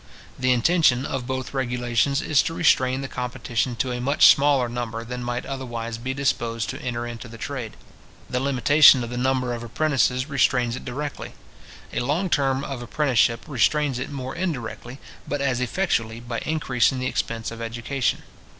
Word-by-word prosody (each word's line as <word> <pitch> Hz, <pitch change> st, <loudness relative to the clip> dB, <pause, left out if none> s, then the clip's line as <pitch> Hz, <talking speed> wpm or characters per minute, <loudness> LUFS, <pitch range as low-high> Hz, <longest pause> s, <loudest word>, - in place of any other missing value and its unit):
The 130 Hz, 0 st, +2 dB
intention 130 Hz, 0 st, +3 dB
of 130 Hz, -3 st, -4 dB
both 130 Hz, 0 st, -4 dB
regulations 125 Hz, +2 st, 0 dB
is 145 Hz, -3 st, +3 dB
to 165 Hz, -, -3 dB
restrain 130 Hz, -6 st, +3 dB
the 135 Hz, -, -4 dB
competition 125 Hz, -1 st, -2 dB
to 125 Hz, +2 st, -1 dB
a 125 Hz, 0 st, -3 dB
much 140 Hz, +4 st, +7 dB
smaller 140 Hz, -3 st, +2 dB
number 120 Hz, -1 st, -4 dB
than 125 Hz, +1 st, -5 dB
might 120 Hz, 0 st, -3 dB
otherwise 120 Hz, -4 st, -5 dB
be 130 Hz, +3 st, -3 dB
disposed 115 Hz, -5 st, -1 dB
to -, -, -8 dB
enter 120 Hz, -1 st, -3 dB
into 120 Hz, 0 st, -7 dB
the 115 Hz, 0 st, -11 dB
trade. 120 Hz, -, -6 dB, 0.5 s
The 125 Hz, -, -1 dB
limitation 135 Hz, 0 st, +6 dB
of 120 Hz, -, -6 dB
the 125 Hz, -, -4 dB
number 125 Hz, -1 st, 0 dB
of 120 Hz, -, -5 dB
apprentices 130 Hz, +1 st, 0 dB
restrains 125 Hz, -4 st, +1 dB
it -, -, -8 dB
directly. 140 Hz, +3 st, -5 dB, 0.6 s
A -, -, 0 dB
long 155 Hz, +9 st, -1 dB
term 135 Hz, -2 st, +1 dB
of 135 Hz, -3 st, -5 dB
apprenticeship 120 Hz, -3 st, +1 dB
restrains 140 Hz, 0 st, +1 dB
it 130 Hz, -, -4 dB
more 130 Hz, -2 st, -5 dB
indirectly, 125 Hz, -7 st, -4 dB, 0.3 s
but 145 Hz, -, -2 dB
as 130 Hz, -3 st, 0 dB
effectually, 120 Hz, -6 st, -1 dB
by 120 Hz, -1 st, -4 dB
increasing 135 Hz, -5 st, +1 dB
the 130 Hz, -, -3 dB
expense 115 Hz, -3 st, -2 dB
of 115 Hz, 0 st, -8 dB
education. 120 Hz, +3 st, -2 dB
125 Hz, 170 wpm, -24 LUFS, 120-140 Hz, 0.6 s, much